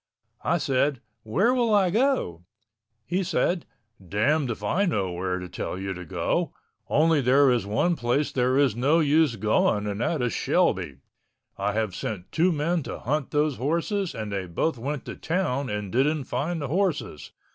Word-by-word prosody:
I - - +2
said, 135 0 +1 0.2
"Where 195 - +2
will 240 -3 +2
I 190 -3 +3
go?" 225 - +1 0.6
He 180 +7 0
said, 175 -1 0 0.4
"Damned 125 - +1
if 115 - -5
I 200 +2 +1
know 95 - 0
where 90 +1 -2
to 90 0 -6
tell 90 - -5
you 95 0 -3
to 90 0 -8
go, - - -1 0.3
only 155 0 +3
there 135 +2 +5
is 120 -5 0
one 170 +12 +1
place 130 +2 0
there 130 +1 +1
is 140 -6 +3
no 140 +7 +3
use 155 -3 +3
going 105 0 +1
and 100 +1 -3
that 150 -1 0
is 120 - 0
Shelby. 65 - +1 0.6
I 100 +1 -1
have 110 -3 -1
sent 95 -1 -5
two 175 +3 +3
men 165 +2 0
to - - -6
hunt 145 +2 -2
those 150 -2 +1
horses 170 - -1
and 110 -2 -5
they 95 -2 -3
both 120 - -1
went 140 +3 -4
to - - -6
town 160 -6 -1
and 105 -2 -4
didn't 140 +4 +1
find 165 +6 -2
the - - -2
horses. 165 - -1
135 Hz, 180 wpm, -26 LUFS, 105-165 Hz, 0.6 s, there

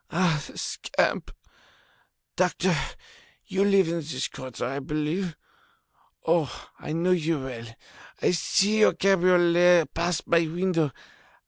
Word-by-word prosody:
Ah, 165 -4 +1
the - - -13
scamp! - - -1 1.1
Doctor, - - +1 0.7
you 195 -2 0
live 195 -3 +4
in 170 +1 -1
this 145 -5 -3
quarter, 130 -2 -6
I 135 +3 -3
believe? 155 +5 -3 0.9
Oh! 165 -4 0
I - - -6
know 170 +3 +1
you 165 -3 +1
well. 120 -3 -7 0.5
I - - +2
see 200 +4 +2
your 215 - +5
cabriolet 175 -2 +4
pass 170 -1 -1
my 170 -1 +2
window. 170 -2 0
170 Hz, 120 wpm, -26 LUFS, 150-180 Hz, 1.1 s, your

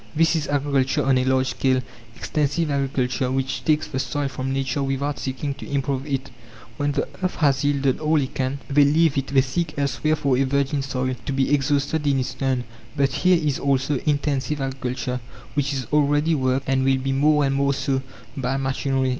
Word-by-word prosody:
This 165 +2 +3
is 155 -3 -1
agriculture 140 0 +1
on 135 -1 +4
a 130 - 0
large 130 0 +2
scale 130 -1 +1 0.4
extensive 150 +1 -1
agriculture, 135 -2 0
which 130 0 -2
takes 155 -1 +2
the 130 - -3
soil 140 +1 -1
from 130 0 -4
nature 135 +1 -1
without 140 +1 -1
seeking 135 +2 -3
to - - -10
improve 140 0 -1
it. 135 -2 -3 0.5
When 145 -1 0
the 140 - -1
earth 185 0 -1
has 140 -4 +2
yielded 140 -2 +1
all 155 0 +2
it 135 -2 -3
can, 130 +1 -1
they 145 +1 +5
leave 155 +1 +3
it; 135 - -5
they 135 -1 +4
seek 150 +4 -3
elsewhere 145 +2 +1
for 140 -4 +1
a - - +4
virgin 140 +1 0
soil, 130 -1 -2
to - - 0
be 135 +1 +1
exhausted 145 +1 +1
in 140 -1 +3
its 130 - -2
turn. 130 -2 -1 0.3
But 140 -1 +3
here 180 +3 +4
is 150 -4 -1
also 135 0 +1
"intensive" 145 0 0
agriculture, 130 -2 -3 0.3
which 145 -1 0
is 135 -3 -2
already 150 +2 +3
worked, 130 -2 0
and 135 0 +2
will 135 0 +3
be 135 +1 -2
more 150 +2 +3
and 135 - +1
more 140 0 +1
so, 135 -1 0 0.3
by 135 0 -1
machinery. 135 0 0
135 Hz, 195 wpm, -23 LUFS, 130-145 Hz, 0.5 s, they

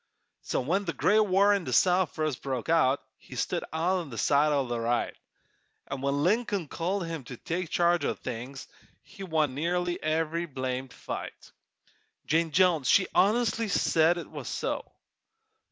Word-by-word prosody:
So - - -1
when 185 +10 0
the 165 - -2
great 210 +1 +3
war 200 0 +4
in 200 -2 0
the 130 - -4
South 180 +2 +3
first 155 -5 -2
broke 130 -2 -3
out 140 -5 +3
He - - -13
stood - - -1
on 170 0 0
the 115 - -8
side 145 +6 +3
o' 140 -2 +1
the 120 -1 -3
right, 120 +1 0 0.7
An' - - -4
when 140 +1 0
Lincoln 200 -2 +1
called 180 +5 -2
him 165 -4 -5
to 125 0 -8
take 170 +4 -3
charge 175 +1 +2
o' - - 0
things, 130 +4 -7 0.4
He 195 0 -14
won 160 -7 0
nearly 175 +4 -1
every 165 +2 -1
blamed 130 -2 -4
fight. - - -7 0.7
Jane 165 +1 +2
Jones 165 -3 +3
she 190 - +4
honestly 225 +2 +2
said 170 -3 +3
it 170 - -7
was - - -7
so! - - -3
165 Hz, 165 wpm, -28 LUFS, 140-185 Hz, 0.7 s, war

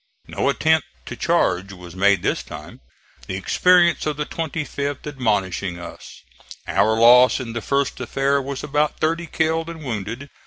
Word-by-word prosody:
No - - -1
attempt 160 +1 +2 0.2
to - - -7
charge 100 - 0
was 90 -2 -12
made 100 -1 +3
this - - 0
time, - - -11 0.5
the 95 - -4
experience 170 - +3
of 150 -1 -2
the 150 - -2
25th 145 -3 -4
admonishing 100 - -1
us. 85 - -11 0.4
Our 110 0 +2
loss 125 +2 +6
in 120 -3 -6
the 115 - -4
first 140 +3 -1
affair 140 +1 0
was 135 0 -6
about 150 +1 0
thirty 165 +2 -1
killed 160 +1 -1
and 165 -2 -8
wounded. 115 +3 -5
140 Hz, 155 wpm, -21 LUFS, 105-155 Hz, 0.5 s, loss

